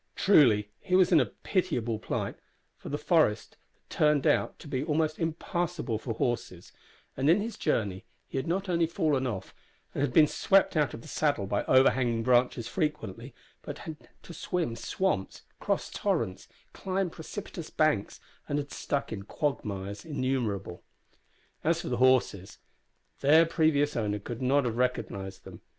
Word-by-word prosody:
Truly, 115 Hz, -, +4 dB
he 185 Hz, -, 0 dB
was 185 Hz, -1 st, +5 dB
in 165 Hz, -, +7 dB
a 130 Hz, -, +2 dB
pitiable 120 Hz, -, -2 dB
plight, -, -, -3 dB, 0.4 s
for -, -, -8 dB
the -, -, -2 dB
forest -, -, +1 dB, 0.3 s
had -, -, -45 dB
turned 150 Hz, -2 st, +2 dB
out -, -, +2 dB
to -, -, -12 dB
be 135 Hz, -2 st, -2 dB
almost 155 Hz, 0 st, 0 dB
impassable 165 Hz, -, -2 dB
for 115 Hz, -1 st, -4 dB
horses, 110 Hz, -8 st, -3 dB, 0.4 s
and 135 Hz, +3 st, +1 dB
in 175 Hz, +5 st, +5 dB
his 220 Hz, +2 st, -4 dB
journey 100 Hz, -, -1 dB, 0.2 s
he -, -, -5 dB
had 130 Hz, -, -4 dB
not 190 Hz, +4 st, -1 dB
only 170 Hz, -2 st, +2 dB
fallen 155 Hz, -6 st, 0 dB
off, 105 Hz, -6 st, -5 dB, 0.4 s
and 140 Hz, -2 st, 0 dB
been 155 Hz, +5 st, +7 dB
swept 195 Hz, +5 st, +2 dB
out 150 Hz, -4 st, +1 dB
of 115 Hz, -, -11 dB
the -, -, -12 dB
saddle 145 Hz, -10 st, 0 dB
by 100 Hz, +1 st, -1 dB
overhanging 130 Hz, -3 st, +3 dB
branches 120 Hz, -1 st, +2 dB
frequently, 135 Hz, -, -3 dB, 0.3 s
but -, -, -7 dB
had 155 Hz, -2 st, -9 dB
to 170 Hz, -, -10 dB
swim 165 Hz, -9 st, -2 dB
swamps, 185 Hz, -, -2 dB, 0.2 s
cross -, -, -1 dB
torrents, 95 Hz, -, -2 dB, 0.3 s
climb 190 Hz, -2 st, -2 dB
precipitous 170 Hz, 0 st, -7 dB
banks, 155 Hz, -10 st, 0 dB, 0.3 s
and 145 Hz, -, 0 dB
had 145 Hz, -1 st, -4 dB
stuck 140 Hz, -5 st, -2 dB
in 100 Hz, -, -5 dB
quagmires 100 Hz, -6 st, -3 dB
innumerable. 125 Hz, -, -2 dB, 0.8 s
As 165 Hz, +1 st, +1 dB
for -, -, -5 dB
the 125 Hz, -, -1 dB
horses 120 Hz, -6 st, +2 dB, 0.6 s
their 155 Hz, +4 st, +6 dB
previous 155 Hz, -3 st, +2 dB
owner 105 Hz, -3 st, -1 dB
could 115 Hz, +4 st, -7 dB
not 135 Hz, +2 st, +2 dB
have 115 Hz, -1 st, -2 dB
recognised 100 Hz, -6 st, -2 dB
them. -, -, -11 dB
140 Hz, 160 wpm, -29 LUFS, 115-160 Hz, 0.8 s, in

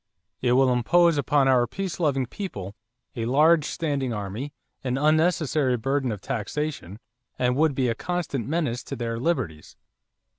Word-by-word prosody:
It 125 Hz, -1 st, +2 dB
will 130 Hz, 0 st, +4 dB
impose 165 Hz, +6 st, +3 dB
upon 140 Hz, -1 st, +2 dB
our 125 Hz, -2 st, +4 dB
peace 190 Hz, -, -4 dB
loving 140 Hz, -6 st, +1 dB
people 105 Hz, -, -6 dB, 0.4 s
a 115 Hz, -2 st, -2 dB
large 150 Hz, +5 st, +4 dB
standing 140 Hz, -7 st, -2 dB
army, 105 Hz, +6 st, -4 dB, 0.3 s
an 130 Hz, 0 st, -1 dB
unnecessary 155 Hz, -3 st, +2 dB
burden 135 Hz, +2 st, 0 dB
of 105 Hz, -3 st, -5 dB
taxation, 135 Hz, -, -4 dB, 0.4 s
and 125 Hz, 0 st, +1 dB
would 150 Hz, 0 st, +2 dB
be 130 Hz, -1 st, +1 dB
a 115 Hz, -, +1 dB
constant 155 Hz, -4 st, -3 dB
menace 145 Hz, -6 st, -1 dB
to -, -, -5 dB
their 115 Hz, -1 st, -3 dB
liberties." 120 Hz, -, -2 dB
135 Hz, 150 wpm, -25 LUFS, 120-155 Hz, 0.4 s, will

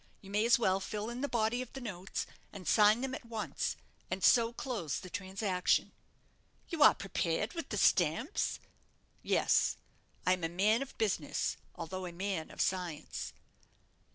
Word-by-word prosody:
You 195 Hz, -, -11 dB
may 210 Hz, +2 st, +2 dB
as 235 Hz, -, +6 dB
well 190 Hz, -5 st, +2 dB
fill 210 Hz, +3 st, -4 dB
in 245 Hz, +2 st, -5 dB
the 285 Hz, -, 0 dB
body 235 Hz, +1 st, +1 dB
of 255 Hz, -, -8 dB
the 270 Hz, -, -6 dB
notes, 195 Hz, -6 st, -4 dB, 0.3 s
and 195 Hz, -3 st, -9 dB
sign 215 Hz, +2 st, +5 dB
them 265 Hz, 0 st, -2 dB
at -, -, -5 dB
once, 230 Hz, -2 st, -3 dB, 0.3 s
and 185 Hz, 0 st, -3 dB
so 230 Hz, -1 st, +6 dB
close 230 Hz, -, -3 dB
the 185 Hz, -, -8 dB
transaction." 190 Hz, -1 st, 0 dB, 0.8 s
"You 330 Hz, -4 st, -3 dB
are -, -, +9 dB
prepared 195 Hz, +1 st, -1 dB
with 335 Hz, -, -5 dB
the -, -, -2 dB
stamps?" -, -, +2 dB, 0.6 s
"Yes; -, -, +2 dB, 0.5 s
I 185 Hz, -, +5 dB
am 180 Hz, -2 st, -3 dB
a 165 Hz, -, +1 dB
man 210 Hz, +7 st, +3 dB
of 275 Hz, -, -6 dB
business, 215 Hz, -4 st, 0 dB, 0.2 s
although 180 Hz, +2 st, -5 dB
a -, -, -6 dB
man 185 Hz, -2 st, -3 dB
of -, -, -4 dB
science." 180 Hz, -5 st, -2 dB
205 Hz, 165 wpm, -33 LUFS, 185-235 Hz, 0.8 s, are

